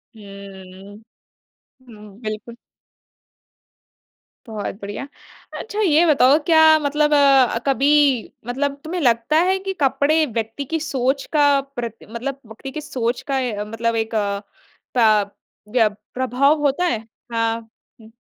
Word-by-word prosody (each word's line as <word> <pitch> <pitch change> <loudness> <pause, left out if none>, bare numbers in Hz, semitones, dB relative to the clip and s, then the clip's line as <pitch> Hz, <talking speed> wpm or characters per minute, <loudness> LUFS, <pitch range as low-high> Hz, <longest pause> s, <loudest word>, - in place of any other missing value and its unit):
हुँ, 215 - -14
हुँ। 195 +1 -12 0.9
हुँ 210 -2 -14
बिल्कुल। 215 +2 -6 1.9
बहुत 215 -3 -5
बढ़िया। 205 +7 -6 0.5
अच्छा 430 -1 -6
ये 340 -3 +4
बताओ 285 -2 +5
क्या 320 -2 +5 0.2
मतलब 295 +1 +1
अ, 270 -5 +4
कभी 275 -1 +2 0.2
मतलब, 275 +3 -1
तुम्हे 350 +3 -4
लगता 240 +2 +2
है 380 - +2
कि 385 0 -4
कपड़े 295 +3 +2
व्यक्ति 230 +2 -4
की 325 +4 -2
सोच 270 -2 -1
का 290 -1 +4
प्रत 245 -5 -7
मतलब 260 +4 -5
व्यक्ति 225 +5 -9
की 305 - -6
सोच 250 -5 -3
का 270 - +1 0.2
अ, - - -1
मतलब 230 +1 -2
एक 225 0 -2
अ, 200 -1 -1 0.6
प 215 -3 +3 0.4
य 225 -3 +4 0.2
प्रभाव 260 +4 +2
होता 285 +6 +1
है? 230 -11 0 0.3
हाँ, 230 0 -2 0.3
हुँ। 220 +1 -16
250 Hz, 130 wpm, -21 LUFS, 220-285 Hz, 1.9 s, बताओ